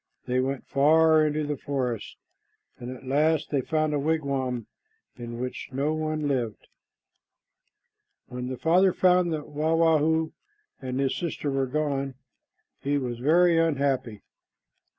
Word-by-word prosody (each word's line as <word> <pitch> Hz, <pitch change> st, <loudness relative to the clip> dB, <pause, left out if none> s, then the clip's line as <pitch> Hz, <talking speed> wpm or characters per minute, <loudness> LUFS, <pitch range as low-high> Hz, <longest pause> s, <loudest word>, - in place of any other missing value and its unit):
They 125 Hz, 0 st, 0 dB
went 135 Hz, +1 st, -2 dB
far 155 Hz, +2 st, +4 dB
into 150 Hz, 0 st, -1 dB
the 145 Hz, -1 st, -3 dB
forest, 130 Hz, -6 st, -3 dB, 0.6 s
and 120 Hz, 0 st, -7 dB
at 130 Hz, +1 st, -9 dB
last 155 Hz, +4 st, +1 dB
they 140 Hz, -3 st, +1 dB
found 155 Hz, +2 st, 0 dB
a 145 Hz, -, +1 dB
wigwam 140 Hz, -6 st, -1 dB, 0.5 s
in 120 Hz, -1 st, -7 dB
which 125 Hz, 0 st, -5 dB
no 140 Hz, +4 st, 0 dB
one 155 Hz, -1 st, -2 dB
lived. 120 Hz, -6 st, -2 dB, 1.6 s
When 125 Hz, 0 st, -6 dB
the 130 Hz, 0 st, -4 dB
father 180 Hz, +5 st, +3 dB
found 180 Hz, -1 st, +3 dB
that 155 Hz, -2 st, -4 dB
Wah 155 Hz, +2 st, 0 dB
wah 165 Hz, -1 st, +4 dB
hoo 160 Hz, +1 st, +1 dB, 0.5 s
and 130 Hz, 0 st, -3 dB
his 135 Hz, -1 st, +1 dB
sister 160 Hz, -4 st, -3 dB
were 135 Hz, -1 st, 0 dB
gone, 140 Hz, -1 st, -2 dB, 0.6 s
he 145 Hz, +1 st, 0 dB
was 125 Hz, -4 st, -3 dB
very 165 Hz, +5 st, +4 dB
unhappy. 140 Hz, -8 st, 0 dB
145 Hz, 140 wpm, -26 LUFS, 130-155 Hz, 1.6 s, far